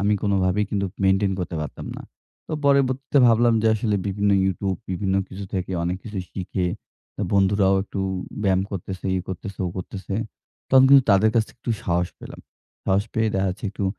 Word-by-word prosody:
আমি 105 +1 +2
কোনভাবেই 100 0 +2
কিন্তু 100 -1 0 0.2
মেইনটেইন 95 +1 +3
করতে 85 -2 -4
পারতাম 75 - -7
না। - - -8 0.5
তো - - -5
পরবর্তীতে 140 0 +2
ভাবলাম 115 0 +4
যে 110 - +4
আসলে 105 -1 0
বিভিন্ন 100 +1 +1
ইউটিউব। 95 0 -1 0.2
বিভিন্ন 95 +1 -1
কিছু 100 +1 -7
থেকে 95 0 -2
অনেক 90 +1 -1
কিছু 105 -3 -5
শিখে 95 -1 -2 0.5
অ্যা - - -2
বন্ধুরাও 95 0 +3
একটু 100 - -5 0.4
ব্যায়াম 95 -2 +3
করতেছে, 95 0 -5
ই - - +1
করতেছে, 95 +1 -6
ও - - -1
করতেছে। 95 +1 -5 0.6
তখন 130 0 +7
কিন্তু 140 -1 +8
তাদের 100 +3 +5
কাছ 115 - +4
থেকে - - -19
একটু 120 - -3
সাহস 85 0 +1
পেলাম। - - -10 0.4
সাহস 100 +1 +2
পেয়ে 110 0 +2
দেখা 95 0 +1
হচ্ছে 95 +5 -8
একটু 100 - -4
100 Hz, 180 wpm, -23 LUFS, 95-110 Hz, 0.6 s, কিন্তু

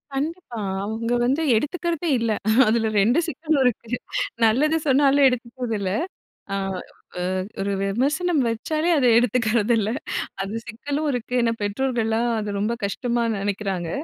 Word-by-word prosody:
கண்டிப்பா 295 -5 -4 0.2
அவங்க 225 +3 -2
வந்து 270 +6 +1
எடுத்துக்கிறதே 335 +6 -1
இல்ல 230 -1 0 0.4
அதில 225 0 +2
ரெண்டு 240 +10 +3
சிக்கலும் 315 -3 0
இருக்கு 235 -2 0 0.6
நல்லது 295 +9 +3
சொன்னாலும் 275 +1 +5
எடுத்துக்கறது 245 -1 -2
இல்ல. 190 -2 -2 0.6
அ - - 0 0.6
ஓ - - -2 0.4
ஒரு 200 +1 -1
விமர்சனம் 285 - +1
வச்சாலே 310 +9 -1
அத 270 - +2
எடுத்துக்கிறதில்ல 230 -2 +2 0.5
அது 195 +2 -5
சிக்கலும் 285 +6 -3
இருக்கு 245 -1 -4
ஏன்னா 230 -1 +2
பெற்றோர்கலாம் 230 +1 0
அத 205 -1 -3
ரொம்ப 215 +3 0
கஷ்டமா 235 +3 -1
நெனக்கிறாங்க 195 -3 -2
240 Hz, 125 wpm, -23 LUFS, 220-280 Hz, 0.6 s, சொன்னாலும்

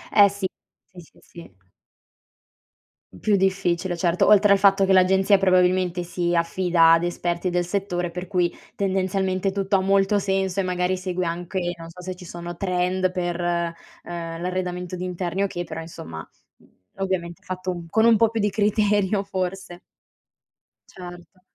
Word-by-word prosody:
Eh 200 -1 +8
sì, 200 -1 -3 0.4
sì, 180 - -15
sì, 160 - -21
sì. 165 - -14 1.6
Più 210 -2 +2
difficile, 185 -2 0
certo 170 0 +1
oltre 205 -1 +6
al - - +4
fatto 195 0 +4
che 190 - +3
l'agenzia 190 +2 +4
probabilmente 185 -1 +2
si 175 0 -2
affida 170 -1 +3
ad 165 +1 +3
esperti 175 +1 -2
del 175 0 +1
settore, 180 -1 -2
per 180 +2 -6
cui 180 -3 0 0.2
tendenzialmente 190 0 0
tutto 195 0 0
ha 190 - +3
molto 195 +1 +2
senso 195 -1 -1
e - - +2
magari 180 0 0
segue 185 -1 -3
anche, 175 +2 -3 0.2
non 165 0 -10
so 180 - -12
se 185 0 -6
ci 180 0 -12
sono 175 0 -7
trend 185 0 0
per, 175 -1 -3
uhm, 170 -1 -4
l'arredamento 180 0 -3
di 180 - -5
interni 180 +1 -2
o - - +1
che, 175 -2 -5
però 165 -1 -7
insomma, 80 - -9 0.3
uhm, - - -24 0.3
ovviamente 190 -1 -3
fatto 185 -2 -4
con 220 +6 +2
un 230 -1 +6
po' 225 0 +4
più 225 -1 -2
di 210 - +2
criterio 205 -1 +1
forse. 185 -2 -4 1.1
Certo. 180 0 -12
185 Hz, 160 wpm, -23 LUFS, 175-195 Hz, 1.6 s, Eh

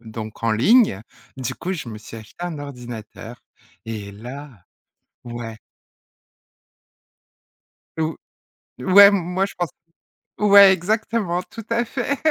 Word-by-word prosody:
donc, 110 -1 -8
en 115 -1 +2
ligne. 130 - +4 0.3
Du 130 -1 -4
coup, 180 +7 -4
je 160 -9 -5
me 110 -2 -7
suis 110 +1 -11
acheté 115 +9 -12
un 170 -4 -5
ordinateur 120 -4 -9 0.4
et 105 -3 -6
là 125 0 -10 0.6
ouais. 120 -2 -7 2.4
Ou 160 0 -1 0.6
ouais, 195 +9 +8
m 200 - +4
moi 180 +1 -1
je 200 - -9
pense 175 -2 -1 0.7
ouais 200 -1 +8
exactement, 190 -1 -1
tout 225 +2 -11
à 230 +1 +1
fait, 260 +3 -2
145 Hz, 120 wpm, -22 LUFS, -, 2.4 s, ouais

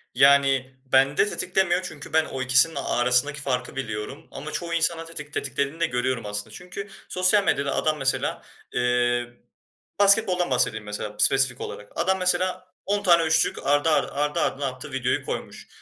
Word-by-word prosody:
Yani, 135 -1 +4
bende 135 +6 +3
tetiklemiyor 185 -2 +1
çünkü 155 -6 -8
ben 160 0 +4
o 130 - -5
ikisinin 130 +5 +3
arasındaki 125 +4 +1
farkı 125 -3 -2
biliyorum 130 +5 -5
ama 155 +2 -7
çoğu 170 +1 -4
insanın 165 0 0
tetik 150 -3 -9
tetiklediğini 140 +3 -2
de 170 - +3
görüyorum 125 -3 -1
aslında. 105 0 -4
Çünkü 185 +3 -8 0.2
sosyal 185 +3 +3
medyada 140 -6 0
adam 155 -1 +1
mesela, 135 -1 -1 0.3
eee, 120 0 +1 0.8
basketboldan 195 -5 +4
bahsedeyim 120 -4 0
mesela 105 0 -5
spesifik 130 0 +2
olarak. 105 - -8
Adam 190 +3 +1
mesela 185 0 -1
10 205 +1 0
tane 170 -4 +5
3'lük 155 -3 +1
ardı 145 +3 +3
ardı 155 - +2
ardı 150 +1 0
ardına 140 +1 -1
attığı 130 +2 -7
videoyu 130 -1 -1
koymuş. - - -6
140 Hz, 155 wpm, -24 LUFS, 125-170 Hz, 0.8 s, tane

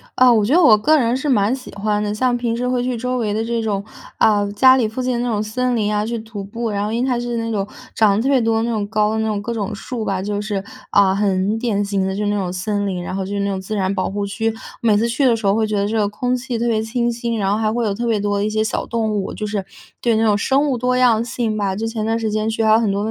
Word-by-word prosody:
啊， 255 -1 +6
我 215 -3 +3
觉 265 +9 +2
得 360 - +6
我 220 -8 +7
个 305 +9 +3
人 245 -3 +1
是 265 +3 -3
蛮 215 -2 +3
喜 260 - -11
欢 210 +1 0
的。 205 - -2
像 245 +3 +1
平 235 -1 -1
时 250 +1 -2
会 250 -1 0
去 250 0 -1
周 250 +2 -2
围 215 -4 -1
的 220 +1 -1
这 230 0 -1
种， 205 -3 -2 0.4
呃， 205 -2 +3
家 260 +5 +6
里 235 -4 +2
附 225 +4 -4
近 255 0 0
的 240 - -1
那 245 0 -1
种 210 -2 0
森 250 +3 -1
林 210 -2 0
啊， 210 0 0
去 235 +1 -3
徒 220 -2 -7
步。 230 +4 -4
然 205 -1 -1
后 210 - -3
因 235 +2 0
为 - - 0
它 245 - 0
是 240 0 -3
那 230 0 -2
种 200 -3 -1 0.3
长 210 -3 +4
得 220 - 0
特 270 - +1
别 275 -2 +4
多 225 0 +1
的 225 - +1
那 235 - -1
种 210 -3 -2
高 210 0 +1
的 220 - -1
那 220 - 0
种 210 -2 -1
各 235 +3 -4
种 215 -1 -3
树 225 +2 -5
吧， 190 -1 -1
就 205 +1 -2
是， 205 -2 -3 0.3
呃， 195 -2 +4
很 200 +1 +1
典 210 -4 0
型 200 -1 -1
的 190 - -2
就 210 - -2
是 - - +1
那 205 - 0
种 185 -3 -2
森 205 +2 -2
林， 180 -2 -3
然 185 - -5
后 195 - -2
就 200 - -5
是 200 - -1
那 200 - 0
种 195 -1 -2
自 205 +3 -5
然 190 -1 0
保 185 - -1
护 205 +1 -3
区。 225 +2 -1 0.3
每 220 -3 +3
次 225 +3 +1
去 270 +4 +1
的 240 -3 +4
时 220 -2 -5
候 195 - +4
会 220 +1 +1
觉 215 - -2
得 200 0 +1
这 220 +2 -1
个 210 -1 +2
空 250 +4 -1
气 250 -1 -3
特 235 +1 -1
别 220 -2 +1
清 235 +2 -1
新， 235 0 -3
然 195 -2 0
后 210 - +1
还 215 -1 0
会 235 0 -1
有 205 - 0
特 235 +4 -3
别 225 -2 +1
多 205 0 0
的 200 - 0
一 - - 0
些 215 0 0
小 220 - -2
动 225 -2 -1
物， 200 -2 -2
就 215 - -4
是， 205 -2 -3 0.4
对， 235 -2 +2
那 220 - +2
种 210 -2 +3
生 270 +7 +2
物 255 - 0
多 250 +1 0
样 235 -3 +4
性 230 -2 -2
吧。 200 -2 -1
就 220 +3 -3
前 225 -1 -3
段 225 +1 0
时 225 -2 -2
间 215 +1 0
去 225 0 -1
还 220 - +4
有 220 - +6
很 225 -3 +1
多 200 +1 -1
220 Hz, 355 characters per minute, -19 LUFS, 205-235 Hz, 0.4 s, 我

